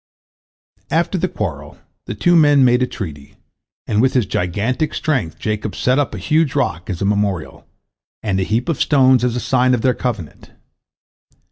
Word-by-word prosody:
After 170 +3 0
the 185 - 0
quarrel, 75 - -5 0.3
the - - -4
two 175 +12 +3
men 145 -4 +5
made 125 0 +3
a 125 - +2
treaty, 75 -11 -8 0.5
and 105 0 +1
with 130 +1 +2
his 125 -4 +3
gigantic 105 - -2
strength 120 - -1
Jacob 105 -1 -3
set 130 +2 +1
up 145 - -1
a - - -6
huge 155 -2 +1
rock 90 - -1
as 90 0 -3
a - - +1
memorial, 100 -4 -2 0.6
and 95 -3 0
a - - +1
heap 110 +6 -1
of 165 - -1
stones 130 -4 +4
as 125 -1 0
a - - -1
sign 130 0 +2
of 115 - -3
their 130 +1 +2
covenant. 115 - -5
125 Hz, 175 wpm, -18 LUFS, 100-135 Hz, 0.6 s, men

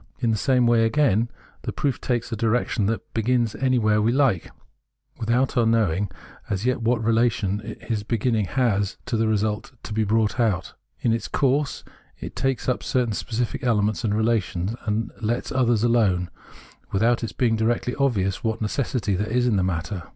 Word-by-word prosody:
In 120 -3 0
the - - +2
same 125 +3 +2
way, 120 -1 +4
again, 115 -2 +2 0.3
the - - -4
proof 140 -4 -1
takes 120 -2 -1
a - - -1
direction 115 -1 +1
that 115 +1 -3
begins 115 0 +1
any 130 -1 +1
where 105 -2 +3
we 110 +2 +2
like, 130 - +2 0.7
without 120 +5 +1
our 120 - +4
knowing 105 -4 +2 0.4
as 100 +1 -2
yet 125 -1 +1
what 115 0 +1
relation 110 -3 +1
'Preface 110 0 -8
4l - - -16
iliis 110 -3 -2
beginning 115 -2 +1
has 105 -3 0
to 125 - -2
the 110 0 +1
result 110 +2 -1
to - - -6
be 110 +1 +1
brought 110 +2 +1
out. 110 -7 0 0.3
In 115 - +2
its 115 - -3
Jourse, 140 +1 0 0.4
it - - -7
takes 135 -1 -1
up 125 - 0
certain 125 -5 0
specific 115 +4 -3
elements 105 -6 +1
and 105 -2 +1
relations 105 -4 0
md 110 +1 0
lets 115 +2 -1
others 120 -4 +2
alone, 105 -7 +2 0.6
without 115 +5 +2
its 115 - -3
being 115 -3 +1
directly 115 +2 0
obvious 105 -9 +1
f?hat 110 -1 -1
necessity 110 -2 -1
there 105 +4 -1
is 125 +2 +1
in 120 -4 +2
the 95 - +2
matter. 85 +1 -3
115 Hz, 185 wpm, -24 LUFS, 105-120 Hz, 0.7 s, way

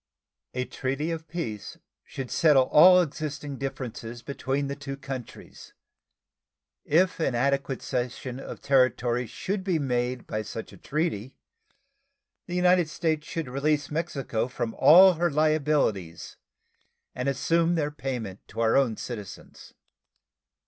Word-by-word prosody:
A 125 0 -1
treaty 135 +7 -3
of 165 -1 -5
peace 150 - -5 0.3
should 130 -2 -7
settle 150 -5 +5
all 180 +4 +8
existing 145 -3 -5
differences 125 -3 -6
between 140 0 -2
the 140 0 -4
two 140 -1 -7
countries. 135 -3 -9 1.1
If 180 +4 +2
an 135 -6 0
adequate 135 +1 0
cession 125 0 -3
of - - -8
territory 125 -2 +2
should 190 - -4
be 185 -3 +1
made 125 -3 -1
by 110 - -3
such 110 +1 -7
a - - -13
treaty, 150 -6 -3 1.1
the 175 - -4
United 180 -2 +3
States 155 -1 -1
should 165 -5 -4
release 145 +3 0
Mexico 140 -8 -2
from 120 -3 -4
all 185 +4 +8
her 175 +1 0
liabilities 150 - 0 0.8
and 125 +2 -2
assume 165 +5 +1
their 150 -3 -1
payment 120 -9 -5
to - - -9
our 115 0 +3
own 130 -5 +2
citizens. 105 -6 -9
140 Hz, 130 wpm, -27 LUFS, 125-155 Hz, 1.1 s, all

